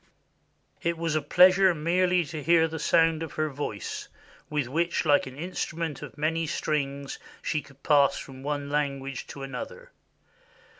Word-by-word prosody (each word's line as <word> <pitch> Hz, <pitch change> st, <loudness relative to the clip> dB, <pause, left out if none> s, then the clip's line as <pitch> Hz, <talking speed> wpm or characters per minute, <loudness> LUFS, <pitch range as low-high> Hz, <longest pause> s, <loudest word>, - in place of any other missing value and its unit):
It 170 Hz, 0 st, 0 dB
was 165 Hz, -1 st, -1 dB
a 155 Hz, -, +2 dB
pleasure 185 Hz, +4 st, +6 dB
merely 180 Hz, +2 st, +2 dB
to 150 Hz, +2 st, -6 dB
hear 165 Hz, +1 st, +4 dB
the 160 Hz, 0 st, -5 dB
sound 165 Hz, 0 st, +3 dB
of 165 Hz, -3 st, -5 dB
her 155 Hz, 0 st, 0 dB
voice, 130 Hz, -8 st, -5 dB, 0.4 s
with 150 Hz, -3 st, 0 dB
which, 170 Hz, +6 st, 0 dB
like 145 Hz, -2 st, +4 dB
an 130 Hz, 0 st, -10 dB
instrument 165 Hz, -2 st, -3 dB
of -, -, -9 dB
many 160 Hz, +2 st, 0 dB
strings, 140 Hz, -2 st, -2 dB, 0.2 s
she 155 Hz, -, 0 dB
could 135 Hz, 0 st, -19 dB
pass 140 Hz, -2 st, +4 dB
from 130 Hz, -1 st, -9 dB
one 145 Hz, 0 st, -2 dB
language 140 Hz, -3 st, -2 dB
to 140 Hz, -, -8 dB
another. 135 Hz, -, -7 dB
150 Hz, 155 wpm, -27 LUFS, 140-165 Hz, 0.4 s, pleasure